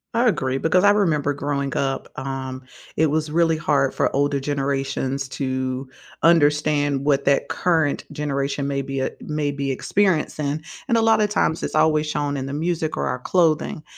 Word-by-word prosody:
I 240 +1 +3
agree, 130 - 0
because 180 +6 +2
I 205 - +7
remember 155 -9 +2
growing 140 -1 -2
up, 135 -1 -1
um, 130 -1 -5 0.3
it 160 - +4
was 155 0 0
really 165 0 +2
hard 140 -3 +1
for - - 0
older 140 0 +1
generations 135 -1 -2
to 130 -1 -3 0.4
understand 150 -3 +3
what 140 -1 +2
that 140 0 +2
current 160 -5 0
generation 140 -1 -2
may 140 -1 -1
be 135 0 -4
e - - 0
may 150 -2 -2
be 140 -1 -3
experiencing 155 -2 0 0.2
and 235 -3 +2
a - - +3
lotta 220 -2 +4
times 185 -5 0
it's - - -4
always 155 0 +3
shown 145 -1 -2
in 135 0 -4
the 140 - -5
music 160 +1 -2
or - - -1
our 125 - -2
clothing, 160 0 +1
145 Hz, 170 wpm, -22 LUFS, 135-160 Hz, 0.4 s, I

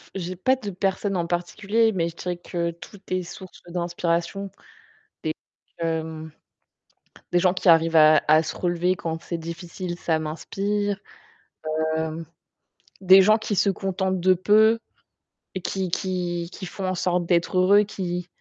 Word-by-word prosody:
j'ai 185 -1 -4
pas 255 +9 +2
de 220 -6 -6
personne 195 +1 -1
en 170 - 0
particulier, 200 +6 +1
mais 170 -4 -1
je 165 - -13
dirais 180 0 -4
que 170 -1 -3
tout 170 +4 -13
est 185 0 -1
source 185 +2 -11
d'inspiration 175 +2 -2 0.7
des 155 - -1 0.5
que 165 - -1
hem 160 -1 -4 1.0
des 175 - +3
gens 180 0 +3
qui 185 - -3
arrivent 165 0 +5
à 155 -1 +7
à 155 +1 +5
se 155 - -5
relever 180 +1 0
quand 165 -2 -4
c'est 170 - -4
difficile, 175 +2 -6
ça 160 -2 0
m'inspire. 200 +6 -2 1.0
Hem, 160 +1 -3 0.8
des 190 0 +8
gens 215 +3 +5
qui 215 -1 -3
se 200 - +3
contentent 190 -1 -2
de 185 +1 +4
peu 215 +5 +4 0.8
et 185 - -4
qui 190 +1 -2
qui 175 -2 -2
qui 190 - -7
font 190 +1 -5
en 185 - 0
sorte 180 0 0
d'être 175 +1 +1
heureux, 200 +3 +5
qui 180 -3 -4
180 Hz, 155 wpm, -24 LUFS, 170-195 Hz, 1.0 s, des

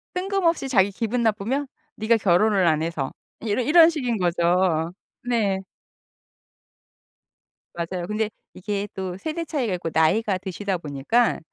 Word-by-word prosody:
뜬금없이 360 -6 0
자기 200 -5 +4
기분 235 +4 -2
나쁘면 230 +6 0 0.3
"네가 225 +2 +3
결혼을 195 0 +3
안 155 -1 +2
해서." 160 -5 -2 0.3
이러 220 +2 0
이런 320 +5 +7
식인 250 -8 -1
거죠. 175 -1 +1 0.3
네. 220 -6 0 2.1
맞아요. 175 +1 -4
근데 215 0 -1 0.2
이게 200 +2 -3
또 185 -1 -5
세대 320 - -4
차이가 255 -11 -1
있고 165 -2 -4
나이가 185 +5 +2
드시다 190 0 -3
보니까 155 - 0
205 Hz, 270 characters per minute, -24 LUFS, 175-240 Hz, 2.1 s, 이런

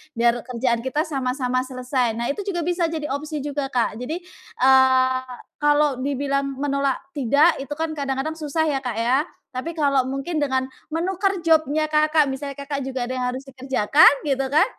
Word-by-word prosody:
Biar 235 +1 +2
kerjaan 235 -1 -1
kita 265 +6 -1
sama-sama 255 -3 -1
selesai," 255 -3 -1
nah 235 +3 -1
itu 405 +7 -6
juga 345 -4 -1
bisa 345 0 0
jadi 310 -3 -4
opsi 295 +1 -4
juga 285 -1 -2
Kak. 240 -4 -1
Jadi, 320 +8 -4 0.4
eee, 260 -1 +5 0.4
kalau 295 -2 +3
dibilang 275 0 -1
menolak 275 -1 0 0.2
tidak 290 +4 +3
itu 275 - -8
kan 320 +1 -2
kadang-kadang 275 +1 -2
susah 315 0 -1
ya, 275 -3 0
Kak, 245 -4 -4
ya. 245 +4 +2 0.3
Tapi 325 +7 -5
kalau 275 -4 +2
mungkin 295 +4 -2
dengan 260 -2 +1 0.2
menukar 375 +4 0
job-nya 310 -1 +3
Kakak, 305 0 +3
misalnya 275 +1 -5
Kakak 280 0 -4
juga 260 -2 -3
ada 255 - -4
yang 255 -1 -2
harus 260 +2 -6
dikerjakan 265 0 +4 0.2
gitu 275 -2 +1
kan, 295 +3 +4
275 Hz, 170 wpm, -23 LUFS, 260-305 Hz, 0.4 s, eee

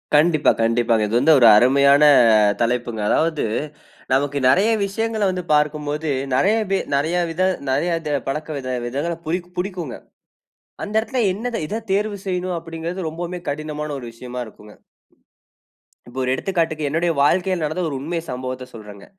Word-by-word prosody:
கண்டிப்பா. 155 0 +4
கண்டிப்பாங்க. 115 -1 +2
இது 110 +3 +1
வந்து 160 +5 +5
ஒரு 120 - +7
அருமையான 140 +4 +5 0.6
தலைப்புங்க. 120 -1 -1
அதாவது 160 -1 +1 0.7
நமக்கு 140 +1 +1
நிறைய 195 +11 +4 0.2
விஷயங்கள 220 +2 -2
வந்து 185 -1 -3
பார்க்கும்போது, 150 +1 0 0.3
நிறைய 200 +10 +3 0.2
வி 195 - +3 0.2
நிறைய 160 +5 0
வித 165 +2 -4 0.3
நிறைய 170 +5 0
இத 150 -2 -3
பழக்க 150 +3 -3 0.4
விதங்கள 140 +8 -2
புதிக் 175 +2 -3
புடிக்குங்க. 180 -7 -4 0.9
அந்த 210 - -6
இடத்துல 245 +3 -2
என்னத 230 +5 -3
இத 220 +7 -4
தேர்வு 205 +1 0
செய்யணும், 180 -1 -2
அப்டிங்கிறது 165 +2 -5
ரொம்பமே 175 +2 -5
கடினமான 150 +1 -4
ஒரு 130 - -8
விஷயமா 125 +2 -8
இருக்குங்க. 105 -1 -15 1.4
இப்போ 125 +2 -10
ஒரு 125 - 0
எடுத்துக்காட்டுக்கு, 160 -2 -1
என்னுடைய 165 +3 +1
வாழ்க்கையில 180 +3 +1
நடந்த 155 +4 -2
ஒரு 140 - -4
உண்மை 165 +4 -3
சம்பவத்த 130 0 -5
சொல்றங்க. 105 -3 -11
155 Hz, 140 wpm, -21 LUFS, 130-180 Hz, 1.4 s, ஒரு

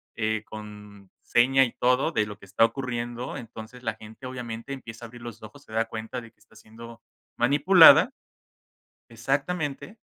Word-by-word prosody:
eh, 110 -1 -1
con 105 -2 -11
seña 135 +3 +4
y 120 - -1
todo 125 +6 +1
de 110 -8 0
lo 105 -1 -8
que 100 - -15
está 100 +4 +2
ocurriendo, 120 +1 -2
entonces 115 0 -10
la 110 -3 -3
gente, 110 +4 -11
obviamente, 120 -1 -7
empieza 120 -3 -8
a - - -8
abrir 120 +1 -13
los 120 -2 -9
ojos, 110 +7 -13
se 110 - -15
da 115 +1 +1
cuenta 115 +2 -6
de 115 - -13
que - - -42
está 105 +1 -24
siendo 115 +2 -13 0.4
manipulada 145 +8 +7 1.0
exactamente, 140 - -3
115 Hz, 165 wpm, -26 LUFS, 110-130 Hz, 1.0 s, manipulada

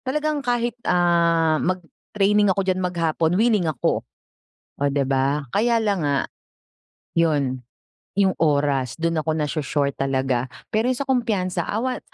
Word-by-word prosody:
Talagang 300 +2 -1
kahit, 240 -2 0 0.2
ah, 170 -2 +3
mag-training 195 +3 0
ako 190 +1 +1
diyan 185 -1 0
maghapon, 165 -3 0
willing 215 -6 +2
ako. 140 -6 0 0.8
Oh, 145 - +2
di 140 0 +1
ba? 135 +2 0
Kaya 230 +1 +2
lang 200 -3 +1
nga, 140 -1 +1 0.9
'yon 145 -6 +1 0.5
yung 195 -1 +3
oras 140 -5 +1
do'n 165 0 0
ako 155 0 -1
nasho-short 150 -2 -1
talaga 130 -2 0 0.2
pero 220 +3 +1
sa 280 - -2
kumpiyansa 225 -9 -1
awa 250 +4 -2
170 Hz, 130 wpm, -22 LUFS, 145-210 Hz, 0.9 s, ah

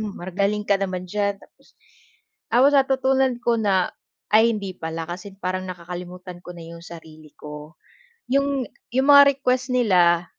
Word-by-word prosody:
magaling 200 0 -2
ka 200 -1 +3
naman 185 -2 -3
diyan." 200 -1 -1
Tapos - - -22 0.9
tapos 265 +4 +5
natutunan 265 -1 +2
ko 235 -1 +2
na 190 -4 +1 0.4
ay 225 +2 +5
hindi 195 -2 -5
pala. 160 0 -5
Kasi 185 +3 -8
parang 185 0 -3
nakakalimutan 180 0 -8
ko 180 - -8
na 165 - -10
'yong 170 0 -11
sarili 155 -3 -13
ko. 150 +2 -10 0.6
'Yong 275 -1 +1 0.3
'yong 265 +1 +3
mga 280 0 +10
request 255 0 0
nila, 175 -7 +3
195 Hz, 145 wpm, -23 LUFS, 175-245 Hz, 0.9 s, mga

